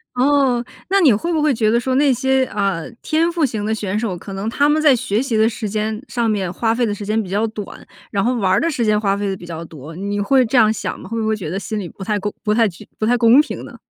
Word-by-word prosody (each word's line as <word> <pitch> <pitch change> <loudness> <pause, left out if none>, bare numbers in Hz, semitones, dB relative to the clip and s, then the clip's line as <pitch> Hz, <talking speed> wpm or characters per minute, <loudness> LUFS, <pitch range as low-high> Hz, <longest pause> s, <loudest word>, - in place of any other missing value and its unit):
哦， 260 -2 +2 0.3
那 395 +1 +3
你 290 -8 +6
会 335 +12 0
不 315 - +1
会 300 0 +3
觉 220 -1 +2
得 235 - +3
说 260 +1 -1
那 280 0 +4
些， 265 +1 +1
啊， 195 -7 -1 0.2
天 325 +2 +1
赋 335 -2 -1
型 220 -6 -1
的 220 - 0
选 210 -1 -2
手， 220 -6 -2
可 190 +3 -9
能 195 +3 -4
他 285 +5 +2
们 300 +1 +3
在 300 -4 +5
学 215 -3 -1
习 245 -5 -2
的 220 +1 +4
时 220 -1 -5
间 215 +1 -2
上 235 -2 -1
面 195 -5 -1
花 225 +4 0
费 240 0 +1
的 210 - -1
时 205 - -7
间 215 +2 0
比 185 - -9
较 210 +4 0
短， 215 -2 -8 0.3
然 200 -1 0
后 250 +2 +1
玩 195 -5 +1
儿 - - +3
的 335 - +1
时 245 -7 -1
间 210 0 +3
花 200 -2 0
费 205 0 -2
得 195 - -1
比 175 - -11
较 165 0 -6
多， 155 0 -11
你 200 +3 -3
会 260 +5 +3
这 240 - -3
样 220 -3 +6
想 210 - -4
吗？ - - -11
会 230 - -2
不 220 - -1
会 220 - +1
觉 175 -7 -6
得 185 - -3
心 210 +3 -4
里 185 -4 -6
不 195 - -10
太 210 +1 -1
公 205 +1 -3
不 210 -2 +1
太 225 0 +3
具 175 -4 -10
不 215 - 0
太 245 +1 +3
公 240 +4 +6
平 - - -6
呢？ - - -11
220 Hz, 325 characters per minute, -19 LUFS, 200-250 Hz, 0.3 s, 你